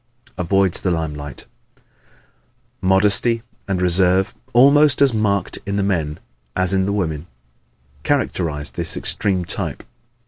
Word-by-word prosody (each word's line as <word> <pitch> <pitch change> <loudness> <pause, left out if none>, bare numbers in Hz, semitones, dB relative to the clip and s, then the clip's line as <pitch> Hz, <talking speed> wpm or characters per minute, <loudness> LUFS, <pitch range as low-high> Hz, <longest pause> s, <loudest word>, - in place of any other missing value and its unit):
Avoids 95 0 +2
the 95 - 0
Limelight 75 -5 -4 0.3
¶ - - -30 1.0
Modesty 105 +5 +3 0.2
and 95 -2 -1
reserve, 90 +1 +2 0.2
almost 140 +3 +5
as 140 -3 +4
marked 100 -4 0
in 100 - -3
the 100 - 0
men 80 -6 -1 0.4
as 95 0 +2
in 95 0 +1
the - - 0
women, 85 -6 -2 0.8
characterize 80 - -1
this - - -4
extreme 95 -3 -1
type. - - -5
95 Hz, 125 wpm, -20 LUFS, 85-100 Hz, 1.0 s, almost